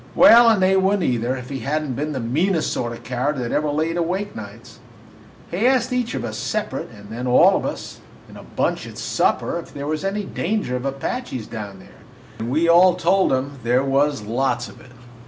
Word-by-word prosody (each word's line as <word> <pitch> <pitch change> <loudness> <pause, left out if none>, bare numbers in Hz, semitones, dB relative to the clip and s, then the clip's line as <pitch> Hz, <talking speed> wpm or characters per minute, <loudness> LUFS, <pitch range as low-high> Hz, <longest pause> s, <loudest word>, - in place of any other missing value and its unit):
Well, 235 0 +8
and 210 -4 +3
they 190 +1 +4
would 190 +2 +3
n't, - - 0
either, 120 -2 0
if 125 -1 -8
he 135 -1 -4
had 150 +6 -1
n't 135 -5 -4
been 150 +4 -3
the 135 - -3
meanest 155 +9 0
sort 120 -1 -2
of 120 - -6
a - - -16
coward 130 +5 -2
that 120 -2 -3
ever 150 0 0
laid 160 +3 -1
awake 185 +4 -2
nights. 115 +3 -10 0.7
He 200 +8 +1
asked 255 -1 +2
each 250 -2 -1
of - - -3
us - - -5
separate, 210 -10 -3
and 105 -3 -14
then 120 +3 -4
all 125 - +6
of - - -1
us - - -7 0.3
in - - -14
a - - -10
bunch - - -2
at - - -11
supper, - - 0
if - - -11
there 140 0 -5
was 155 +3 -2
any 200 +2 -2
danger 200 - -2
of 125 +1 -4
Apaches 135 - -4
down 105 -4 -7
there, 95 - -17 0.4
and 115 +1 -3
we 155 +6 +1
all 175 +2 +6
told 180 +2 +2
him 135 +1 -2
there 125 +2 +2
was, 140 -2 +1
lots 125 +6 -1
of - - -14
it. 125 - -16
145 Hz, 225 wpm, -21 LUFS, 125-185 Hz, 0.7 s, Well